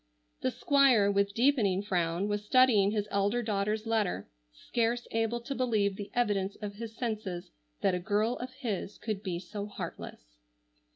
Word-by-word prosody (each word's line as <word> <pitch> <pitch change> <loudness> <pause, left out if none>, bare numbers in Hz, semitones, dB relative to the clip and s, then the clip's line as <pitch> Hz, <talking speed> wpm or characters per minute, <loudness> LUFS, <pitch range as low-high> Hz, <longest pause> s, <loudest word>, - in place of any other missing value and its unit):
The - - +1
Squire 255 - +4
with 200 0 +1
deepening 225 -7 +3
frown 175 -1 0
was 205 0 -1
studying 220 -4 +5
his 210 -1 -1
elder 205 +4 +1
daughter's 210 0 -1
letter, 210 - 0 0.2
scarce 235 - -1
able 225 +1 0
to 255 +4 -4
believe 220 -6 +1
the 200 0 -7
evidence 205 -5 +1
of 205 -1 -5
his 225 0 -7
senses 210 -7 -3 0.3
that 190 - +3
a 180 - 0
girl 215 +5 +1
of 250 - -5
his 220 -6 -4
could 215 -3 -3
be 185 -4 -3
so 200 +3 -6
heartless. - - -8
210 Hz, 160 wpm, -30 LUFS, 195-230 Hz, 0.3 s, studying